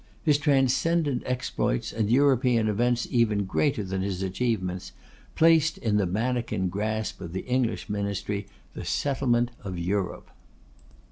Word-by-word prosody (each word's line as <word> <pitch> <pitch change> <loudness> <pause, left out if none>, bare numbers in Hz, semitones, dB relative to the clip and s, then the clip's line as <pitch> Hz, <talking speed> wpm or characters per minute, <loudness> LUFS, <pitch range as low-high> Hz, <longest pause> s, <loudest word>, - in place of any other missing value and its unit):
His 150 -3 +3
transcendent 145 0 +2
exploits, 125 - -1
and 110 -2 0
European 125 -3 +3
events 120 +3 +1
even 110 -4 +2
greater 110 +3 0
than 95 0 -3
his 95 -1 -2
achievements, 95 -3 -2 0.4
placed 160 -1 +4
in 105 -3 0
the 100 -3 +2
manikin 115 -1 -1
grasp 110 +2 -3
of 85 - -7
the 95 - -4
English 125 -2 0
ministry, 100 0 -3 0.3
the - - -7
settlement 125 -4 0
of 95 -3 -5
Europe. 90 +2 -2
110 Hz, 130 wpm, -26 LUFS, 100-130 Hz, 0.4 s, placed